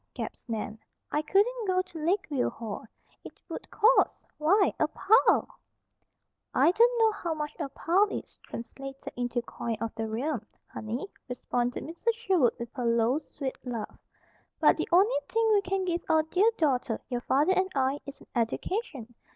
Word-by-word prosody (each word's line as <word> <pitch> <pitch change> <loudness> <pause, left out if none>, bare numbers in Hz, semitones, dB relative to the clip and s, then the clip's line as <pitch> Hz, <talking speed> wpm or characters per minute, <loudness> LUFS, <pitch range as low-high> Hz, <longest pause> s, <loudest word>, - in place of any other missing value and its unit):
gasped - - -6
Nan. 220 -1 -4 0.3
"I 300 - +1
couldn't 420 +8 +2
go 370 0 +2
to 325 -4 -9
Lakeview 320 -6 +1
Hall. 220 -2 -6 0.4
It - - -12
would - - -7
cost, 450 +4 +5 0.3
why! 385 +7 +4
a - - +3
pile!" 435 +5 +4 1.1
"I - - +5
don't 475 +5 +4
know 445 -1 +5
how 345 -6 -3
much 300 -1 -4
a 275 - -2
pile 365 +9 +2
is, - - -7
translated 270 +3 -8
into 245 0 -1
coin 230 -1 -4
of 230 -1 -3
the 225 0 -3
realm, 240 +2 -2 0.2
honey," 230 - -5 0.2
responded 245 0 -2
Mrs. 345 +8 -1
Sherwood 380 - +2
with 235 0 -7
her 250 -4 -3
low, 235 +4 +3
sweet 275 -4 -6
laugh. 235 -4 -5 0.6
"But - - +5
the - - -2
only 380 +1 +5
thing 455 0 +2
we 410 - +4
can 385 0 -1
give 345 -1 -1
our 315 0 +4
dear 370 +7 +3
daughter, 255 -7 +1
your 245 -1 -2
father 290 +9 +3
and 375 0 +1
I, 270 +1 +1
is 280 - -9
an - - -16
education. 245 - -2
300 Hz, 165 wpm, -29 LUFS, 245-385 Hz, 1.1 s, cost